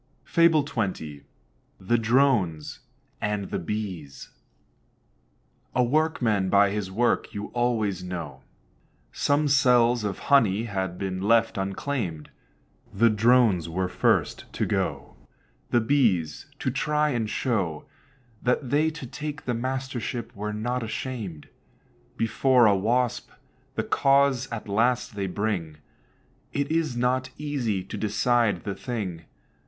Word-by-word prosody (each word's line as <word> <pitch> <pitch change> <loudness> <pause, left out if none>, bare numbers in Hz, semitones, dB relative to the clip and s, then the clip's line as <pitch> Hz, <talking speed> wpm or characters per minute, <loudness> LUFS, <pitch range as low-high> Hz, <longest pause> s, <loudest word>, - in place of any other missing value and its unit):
FABLE 165 -3 +4
XX. 95 - -3 0.6
THE 105 +6 +1
DRONES 115 - +1 0.4
AND 105 -2 -2
THE - - -1
BEES. 90 -9 -5 1.5
A 125 - +4
Workman 120 -8 +1
by 100 0 +4
his 105 -2 -3
work 120 +6 0
you 105 0 -5
always 110 -6 0
know. 85 -7 -6 0.7
Some 145 +1 +1
cells 125 -4 +4
of 100 -2 -2 0.2
honey 110 -6 +4
had 95 -5 -3
been 95 -1 -3
left 115 +3 +3
unclaimed. 95 - -3 0.6
The 115 +3 +3
Drones 110 -6 +3
were 90 +2 -1
first 90 - 0
to - - -1
go - - -2 0.5
The 120 - +3
Bees, 110 - +1
to 130 - -1
try 150 +3 +1
and 115 -5 -1
show 100 - -1 0.6
That 125 +1 0
they 155 +2 +3
to 150 -4 -8
take 150 +4 -6
the 125 - 0
mastership 125 -1 -4
were 105 +1 -4
not 120 +4 -2
ashamed. 110 - -5 0.7
Before 120 +2 +3
a 105 -2 +5
Wasp 120 +5 0 0.5
the - - 0
cause 135 -2 +2
at 115 -2 -5
last 115 +3 +1
they 100 -1 -2
bring; 90 -6 -2 0.8
It 140 +1 -1
is 160 -6 0
not 130 +1 +1
easy 130 -10 -2
to - - -7
decide 110 -3 +1
the 100 - -3
thing. 95 -9 -5
115 Hz, 125 wpm, -26 LUFS, 95-130 Hz, 1.5 s, a